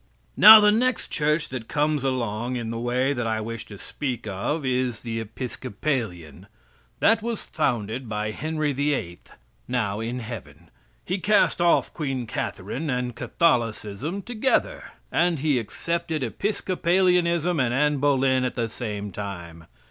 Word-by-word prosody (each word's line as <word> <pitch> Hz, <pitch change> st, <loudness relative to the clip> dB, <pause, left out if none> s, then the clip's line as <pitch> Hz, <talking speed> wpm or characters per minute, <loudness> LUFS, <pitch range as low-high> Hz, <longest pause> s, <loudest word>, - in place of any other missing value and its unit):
Now, 215 Hz, +1 st, +11 dB
the 210 Hz, 0 st, +5 dB
next 245 Hz, +2 st, +1 dB
Church 150 Hz, +1 st, 0 dB
that 120 Hz, -3 st, -6 dB
comes 150 Hz, -1 st, 0 dB
along 120 Hz, -2 st, -1 dB
in 115 Hz, -2 st, -3 dB
the 115 Hz, -, -4 dB
way 125 Hz, +3 st, +1 dB
that 120 Hz, -4 st, -2 dB
I 110 Hz, -1 st, 0 dB
wish 115 Hz, 0 st, -6 dB
to 100 Hz, -, -10 dB
speak 125 Hz, +1 st, -5 dB
of 110 Hz, +10 st, -2 dB
is 125 Hz, -3 st, -1 dB
the 115 Hz, -1 st, -4 dB
Episcopalian. 105 Hz, -, -4 dB, 0.5 s
That 225 Hz, 0 st, +4 dB
was 230 Hz, -1 st, -3 dB
founded 120 Hz, -4 st, -2 dB
by 105 Hz, 0 st, -2 dB
Henry 155 Hz, +3 st, -2 dB
VIII., 135 Hz, -11 st, -1 dB, 0.5 s
now 110 Hz, -5 st, -1 dB
in 115 Hz, +2 st, -3 dB
heaven. 90 Hz, -, -9 dB, 0.3 s
He 185 Hz, +2 st, -1 dB
cast 210 Hz, -2 st, +3 dB
off 175 Hz, -1 st, +3 dB
Queen 135 Hz, -5 st, -3 dB
Catherine 110 Hz, -, -4 dB
and 125 Hz, -2 st, -2 dB
Catholicism 120 Hz, -, 0 dB
together. 250 Hz, -, 0 dB, 0.3 s
And 175 Hz, -1 st, +2 dB
he 145 Hz, -2 st, +1 dB
accepted 165 Hz, +6 st, -3 dB
Episcopalianism 180 Hz, -, +1 dB
and 125 Hz, -3 st, +2 dB
Annie 150 Hz, +3 st, +2 dB
Boleyn 135 Hz, -2 st, +2 dB
at 125 Hz, -, -2 dB
the 115 Hz, -1 st, -1 dB
same 105 Hz, -3 st, -5 dB
time. 85 Hz, -5 st, -7 dB
130 Hz, 140 wpm, -25 LUFS, 110-160 Hz, 0.5 s, Now